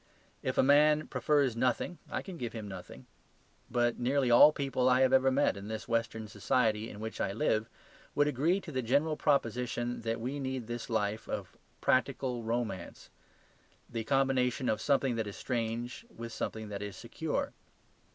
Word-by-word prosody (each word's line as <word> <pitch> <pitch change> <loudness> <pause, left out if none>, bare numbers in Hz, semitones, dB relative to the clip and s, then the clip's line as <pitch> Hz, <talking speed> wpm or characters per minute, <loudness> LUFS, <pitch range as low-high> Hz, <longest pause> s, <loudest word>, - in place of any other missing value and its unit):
If - - -2
a - - +5
man 150 +2 +5
prefers 140 -5 +1
nothing 125 +8 0
I - - -3
can 185 -3 -8
give 120 -2 -4
him 110 -3 -6
nothing. 95 -2 -9 0.6
But 120 -1 +1
nearly 130 +1 +2
all 135 +6 +9
people 135 -3 0
I 125 +1 +4
have 130 0 +4
ever 130 0 +5
met 135 -1 +2
in 100 +1 -8
this 110 0 -5
western 115 -1 -1
society 110 +1 +1
in 105 - -9
which 110 +1 -5
I 95 - 0
live 110 +1 0 0.5
would 145 0 +4
agree 150 +7 +2
to 165 - -8
the 130 -2 -1
general 140 +6 +2
proposition 125 -3 0
that 115 0 -2
we 130 +5 -3
need 130 -3 -3
this 120 +1 -5
life 110 -1 -1
of - - -4 0.3
practical 130 -1 +1
romance; 115 -5 -4 0.8
the 115 -1 -4
combination 130 -1 +1
of 110 0 0
something 135 -4 +2
that 110 -2 -1
is 100 - -6
strange 120 - -3
with 115 - -8
something 110 -1 -4
that 100 -1 -5
is 105 -1 -5
secure. - - -3
120 Hz, 170 wpm, -31 LUFS, 110-135 Hz, 0.8 s, all